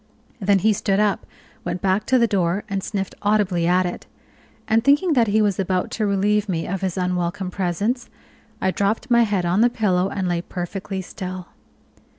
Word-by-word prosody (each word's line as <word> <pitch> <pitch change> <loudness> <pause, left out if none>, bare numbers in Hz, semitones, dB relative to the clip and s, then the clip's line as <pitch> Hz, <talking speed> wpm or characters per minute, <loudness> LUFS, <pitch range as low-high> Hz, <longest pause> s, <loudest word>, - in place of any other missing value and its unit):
Then 200 -1 +3
he 215 +3 +3
stood 195 0 0
up, 210 -2 +1 0.4
went 175 +1 -3
back 190 +3 0
to 260 - +4
the 235 - +4
door 190 -2 0
and 195 -2 -3
sniffed 195 -2 -3
audibly 205 -5 +1
at 180 +1 +3
it; 175 - -5 0.6
and 225 0 +3
thinking 290 +6 +4
that 235 -5 +3
he 215 +1 +3
was 200 -2 0
about 185 -1 -1
to 215 -3 -1
relieve 205 +1 +1
me 165 -3 -1
of 195 +1 -3
his 190 -2 -2
unwelcome 180 0 -1
presence, 200 +7 -1 0.5
I 190 - +1
dropped 200 +6 -1
my 235 0 +6
head 205 -5 +1
on 180 +5 +2
the 240 - +5
pillow 195 -5 +1
and 190 -2 -2
lay 175 -1 0
perfectly 190 +2 -5
still. 185 -1 -7
195 Hz, 185 wpm, -22 LUFS, 180-210 Hz, 0.6 s, my